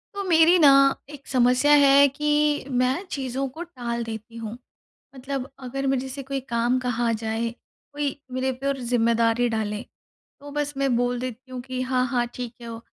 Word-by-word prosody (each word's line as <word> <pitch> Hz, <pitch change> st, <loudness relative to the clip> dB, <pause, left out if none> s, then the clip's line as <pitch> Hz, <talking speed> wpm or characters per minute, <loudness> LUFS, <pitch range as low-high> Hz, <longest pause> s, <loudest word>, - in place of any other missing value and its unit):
वो 400 Hz, -, -3 dB
मेरी 340 Hz, 0 st, +5 dB
ना 290 Hz, -4 st, +8 dB, 0.4 s
एक 290 Hz, -2 st, -12 dB
समस्या 250 Hz, +2 st, +3 dB
है 280 Hz, +1 st, +7 dB
कि 295 Hz, +1 st, +1 dB
मैं 255 Hz, +6 st, +1 dB
चीज़ों 270 Hz, 0 st, -2 dB
को 335 Hz, -, -5 dB
टाल 240 Hz, -8 st, -4 dB
देती 225 Hz, 0 st, -8 dB
हूँ। 225 Hz, 0 st, -6 dB, 0.6 s
मतलब 270 Hz, 0 st, -5 dB, 0.2 s
अगर 275 Hz, +2 st, -3 dB
मेरे 265 Hz, 0 st, 0 dB
से 275 Hz, +1 st, -6 dB
कोई 275 Hz, +1 st, -3 dB
काम 235 Hz, +2 st, +1 dB
कहा 240 Hz, -2 st, 0 dB
जाए, 225 Hz, +1 st, -2 dB, 0.4 s
कोई 285 Hz, -1 st, -3 dB
मेरे 260 Hz, +1 st, -1 dB
पे 265 Hz, +2 st, -5 dB
और 275 Hz, -1 st, 0 dB
ज़िम्मेदारी 235 Hz, -1 st, +2 dB
डाले, 215 Hz, -1 st, -2 dB, 0.6 s
तो 285 Hz, 0 st, -10 dB
बस 295 Hz, 0 st, -2 dB
मैं 275 Hz, -3 st, +1 dB
बोल 245 Hz, 0 st, 0 dB
देती 255 Hz, +1 st, -7 dB
हूँ 250 Hz, -1 st, -5 dB
कि, 255 Hz, 0 st, -5 dB
"हाँ, 255 Hz, 0 st, +1 dB
हाँ, 245 Hz, -2 st, 0 dB
ठीक 245 Hz, -1 st, -6 dB
है, 235 Hz, -, -8 dB
वो 225 Hz, -, -7 dB
255 Hz, 180 wpm, -24 LUFS, 235-275 Hz, 0.6 s, ना